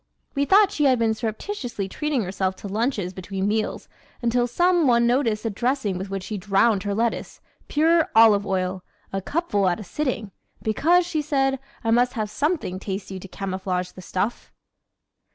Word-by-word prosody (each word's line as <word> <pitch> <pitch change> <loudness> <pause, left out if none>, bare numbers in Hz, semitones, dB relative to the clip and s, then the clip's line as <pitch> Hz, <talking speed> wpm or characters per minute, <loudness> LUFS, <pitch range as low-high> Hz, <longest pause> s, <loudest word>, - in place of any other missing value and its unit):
We 280 0 +1
thought 395 +4 +5
she 295 - +1
had 260 -2 +5
been 225 -1 +2
surreptitiously 225 - -4
treating 290 +3 -1
herself 190 0 -2
to 200 - -8
lunches 205 -3 -1
between 190 +1 -3
meals 215 +1 -1 0.4
until 240 +1 +2
some 345 +5 +3
one 235 -1 +4
noticed 235 -3 +1
the 225 - -1
dressing 230 -3 -1
with 190 +1 -5
which 195 -1 -4
she 210 0 -4
drowned 200 +2 +3
her 200 +1 -2
lettuce: 230 +1 -2 0.3
pure 320 +2 +3
olive 220 -3 +7
oil 185 -1 -2 0.3
a 195 - -1
cupful 205 - 0
at 175 - -1
a - - -6
sitting 235 -4 -3 0.3
"because," 340 +11 +3
she 330 -3 -1
said 270 -2 +1 0.2
"I 225 - +1
must 245 +2 +3
have 215 -4 -3
something 290 - -1
tasty 190 -1 -5
to 195 - -10
camouflage 185 -1 -3
the 185 - -11
stuff." 190 +5 -3
220 Hz, 170 wpm, -24 LUFS, 195-270 Hz, 0.4 s, olive